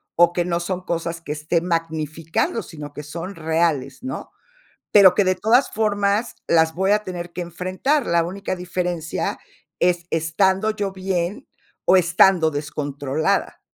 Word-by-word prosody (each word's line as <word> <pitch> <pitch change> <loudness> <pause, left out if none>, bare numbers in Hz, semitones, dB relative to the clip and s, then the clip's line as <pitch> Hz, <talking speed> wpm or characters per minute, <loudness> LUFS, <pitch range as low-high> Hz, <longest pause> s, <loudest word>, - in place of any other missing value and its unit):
o 175 0 +5
que 175 - +1
no 170 -1 -1
son 180 +1 -3
cosas 170 -1 -3
que 150 - -7
esté 155 +3 0
magnificando, 165 +3 -2
sino 150 -4 -9
que 150 - -7
son 170 +6 -6
reales, 160 - -1
¿no? 260 - -6 0.6
Pero 190 -3 +8
que 205 - +3
de 185 0 +2
todas 225 +8 +3
formas 205 +1 0
las 160 -1 +3
voy 190 +3 +1
a 210 0 +3
tener 175 -2 -6
que 180 - -5
enfrentar. 185 - -1
La 170 0 +3
única 185 +3 -4
diferencia 175 -2 -3 0.4
es 175 -1 +2
estando 190 +6 +1
yo 200 -2 -3
bien 185 0 -3 0.4
o 190 - +6
estando 170 -1 +4
descontrolada. 145 0 -2
175 Hz, 150 wpm, -22 LUFS, 160-190 Hz, 0.6 s, Pero